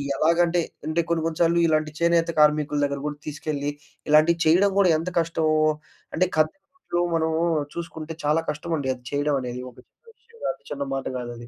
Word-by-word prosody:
ఎలాగంటే 170 +3 +3 0.3
అంటే 160 +2 +1
కొన్ని 170 -1 +1
కొన్ని 165 -1 -2
సార్లు 170 0 +4
ఇలాంటి 155 -1 +1
చేనేత 170 0 +3
కార్మికుల 150 -1 +3
దగ్గర 140 0 -3
గూడా 145 -1 -5
తీసుకెళ్ళి, 145 -1 -3 0.4
ఇలాంటివి 155 +3 +5
చేయడం 185 +5 +5
గూడా 190 -2 +5
ఎంత 165 +3 -3
కష్టమో 160 -1 0 0.6
అంటే 185 - +3
కద్దరు 155 +5 0
బట్టలు 175 - -3 0.2
మనము 160 0 0 0.3
చూసుకుంటే 165 -2 -6
చాలా 150 +2 +2
కష్టం 150 +3 -4
అండి 140 -4 -3
అది 125 -1 -14
చేయడం 145 +1 0
అనేది. 125 -1 -5
ఒక 125 - -20
చిన్న 460 - -22
విషయం 465 0 -22
గాదు, - - -2
చిన్న 140 -1 -3
మాట 135 -1 -3
గాదది. 120 -1 -6
155 Hz, 180 wpm, -24 LUFS, 145-170 Hz, 0.6 s, ఇలాంటివి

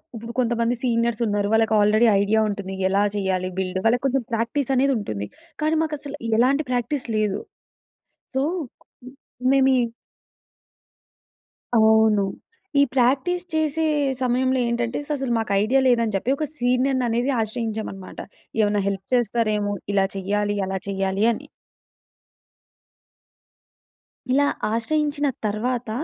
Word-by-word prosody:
ఇప్పుడు 230 +1 -7
కొంతమంది 235 0 +1
సీనియర్స్ 235 -1 0
ఉన్నారు. 205 0 0
వాళ్ళకి 225 0 +3
ఆల్రెడీ 215 +3 +4
ఐడియా 220 +2 +2
ఉంటుంది. 200 -1 -5 0.2
ఎలా 200 +1 +2
చేయాలి 185 -2 -1
బిల్డ్, 185 0 -2
వాళ్ళకి 245 +3 +2
కొంచెం 270 -1 +1
ప్రాక్టీస్ 235 +4 -1
అనేది 270 +1 +3
ఉంటుంది. 105 - -4 0.3
కానీ, 310 +1 +2
మాకు 310 -1 -2
అసలు 285 0 -7 0.2
ఎలాంటి 275 +5 +3
ప్రాక్టీస్ 250 +3 -1
లేదు. 210 -1 0 1.0
సో, 265 - +2 1.1
మేము 270 -1 +4
ఈ - - +3 2.0
అవును. 220 -1 +5 0.6
ఈ - - +7
ప్రాక్టీస్ 275 +8 +2
చేసే 315 0 +1 0.4
సమయంలో 255 +1 +1
ఏంటంటే, 235 +1 -1
అసలు 270 -5 -1
మాకు 220 -2 -2
ఐడియా 255 +5 +3
లేదు 240 -2 +4
అని 215 - -3
చెప్పి, 250 +8 +1
ఒక 310 - -1
సీనియర్‌ని 255 +1 +1
అనేది 240 +4 0
ఆశ్రయించాం 220 0 -2
అన్నమాట. 190 -1 -10 0.4
ఏమైనా 205 -1 +2
హెల్ప్ 195 -1 -3
చేస్తారేమో! 215 -3 +1 0.2
ఇలా 195 -1 +3
చేయాలి, 205 +2 -1
అలా 190 0 -2
చేయాలి 195 +1 0
అని. - - -9 2.8
ఇలా 285 +2 +3 0.3
ఆశ్రయించిన 290 +5 0 0.2
తరువాత 230 +3 -2
230 Hz, 120 wpm, -23 LUFS, 205-260 Hz, 2.8 s, ఈ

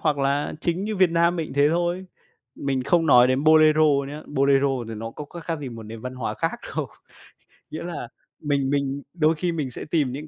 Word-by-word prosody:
hoặc 150 -2 +1
là 140 +1 0
chính 175 +3 -1
như 215 -1 -3
Việt 185 -2 +4
Nam 170 +1 +2
mình 160 -2 -2
cũng - - -10
thế 145 +1 +4
thôi. 175 +2 -1 0.5
Mình 135 -2 -2
không 165 +3 +2
nói 125 -3 +7
đến 130 +3 +1
Bolero 155 0 +6 0.3
nhá, 150 +2 -7
Bolero 140 -1 +2 0.2
thì 115 - -5
nó 115 +1 -6
có 150 - -8
khác 170 +4 -10
khác 165 -2 -3
gì 140 - -5
một 115 -2 -9
nền 110 +1 -9
văn 125 +2 -6
hóa 125 -2 -3
khác - - -2 0.2
đâu. - - -1 0.8
Nghĩa 155 - -6
là 170 -8 -5 0.3
mình 140 -3 0
mình 140 0 -1
đôi 160 -1 +2
khi 175 +3 -1
mình 150 -6 -3
sẽ - - -7
tìm 150 -5 0
những 150 +4 -7
150 Hz, 230 wpm, -24 LUFS, 135-165 Hz, 0.8 s, nói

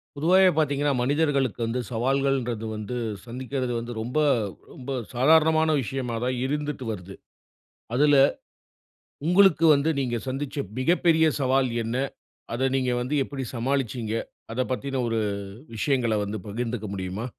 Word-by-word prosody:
பொதுவாவே 185 +6 +5
பார்த்தீங்கன்னா, 145 -2 +2
மனிதர்களுக்கு 140 -3 +1
வந்து 115 +2 -2
சவால்கள்ன்றது 125 -2 0
வந்து 105 +3 -5 0.3
சந்திக்கிறது 125 +1 -3
வந்து 120 +1 -6
ரொம்ப, 125 +7 -1 0.5
ரொம்ப 130 +1 -7 0.2
சாதாரணமான 160 +4 +4
விஷயமா 125 -1 -3
தான் 125 0 -1
இருந்துட்டு 145 -1 -3
வருது. 95 -2 -7 0.8
அதுல 145 +3 +4 1.1
உங்களுக்கு 180 -2 +5
வந்து 140 +3 +1
நீங்க 125 -3 -1
சந்திச்ச 135 +2 -4 0.2
மிகப்பெரிய 165 +2 +3 0.2
சவால் 130 0 +2
என்ன? 115 +2 -3 0.6
அத 130 +3 +1
நீங்க 130 -1 0
வந்து 130 +5 -2
எப்படி 135 -1 -5
சமாளிச்சீங்க? 120 -2 -1 0.4
அதப்பத்தின 130 +2 -2
ஒரு 115 -1 0 0.6
விஷயங்கள 120 -1 +1
வந்து 100 +2 -4
பகிர்ந்துக்க 115 +1 -3
முடியுமா? 95 +3 -4
130 Hz, 115 wpm, -25 LUFS, 120-145 Hz, 1.1 s, பொதுவாவே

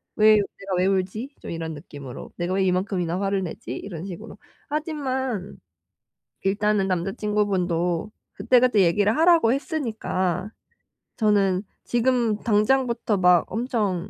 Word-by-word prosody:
'왜 215 0 +6
내가 195 -1 -3
왜 180 - +2
울지?' 195 +8 -2
좀 - - -7
이런 165 -1 -4
느낌으로. 145 -4 -9
'내가 175 +1 -2
왜 195 - +2
이만큼이나 185 -1 0
화를 195 -1 0
내지?' 160 -8 -7
이런 175 -5 -7
식으로. 190 +1 -8 0.3
하지만 265 - -3 0.9
일단은 205 0 +1
남자 185 0 -1
친구분도 190 -4 0 0.2
그때그때 240 +1 +3
얘기를 205 +6 +2
하라고 325 -7 +5
했으니까 220 - -2 0.7
저는 200 -3 +2 0.2
지금 240 -2 +1
당장부터 230 0 +1
막 180 -2 +5
엄청 215 -7 -1
200 Hz, 285 characters per minute, -24 LUFS, 180-230 Hz, 0.9 s, 왜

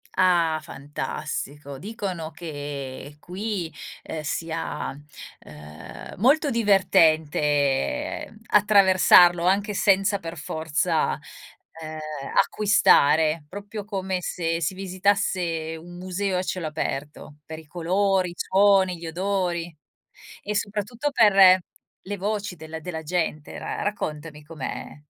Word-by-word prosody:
Ah, 170 -4 +3
fantastico, 140 0 -6
dicono 190 - -5
che 145 -3 -7
qui, 185 -3 -4 0.3
ehm, 160 - -5
sia, 165 +2 -3 0.5
ehm, 75 +1 -11
molto 285 - +3
divertente 170 - +2
attraversarlo 185 -4 +6
anche 200 +3 +2
senza 195 +1 +2
per 165 -1 -7
forza, 155 0 -1 0.6
ehm, 155 0 -6 0.4
acquistare, 160 -6 +4
proprio 205 +4 -7
come 190 -3 -2
se 165 -2 -2
si 165 +2 -1
visitasse 185 -4 -1
un 175 +1 -12
museo 185 +1 -2
a - - -2
cielo 180 -3 -3
aperto 150 0 -5
per 160 0 -8
i 160 - -14
colori, 185 +3 0
i - - -10
suoni, 190 -1 +3
gli 165 0 -8
odori 175 -1 -2 0.7
e 210 +1 -3
soprattutto 210 +7 -3
per 195 -7 +7 0.5
le 205 +1 -5
voci 205 -1 -3
della 160 +1 -8
della 160 -1 -6
gente. 155 -2 -2
Ra - - -5
raccontami 150 -6 -4
com'è? 150 -1 -7
175 Hz, 105 wpm, -24 LUFS, 155-200 Hz, 0.7 s, per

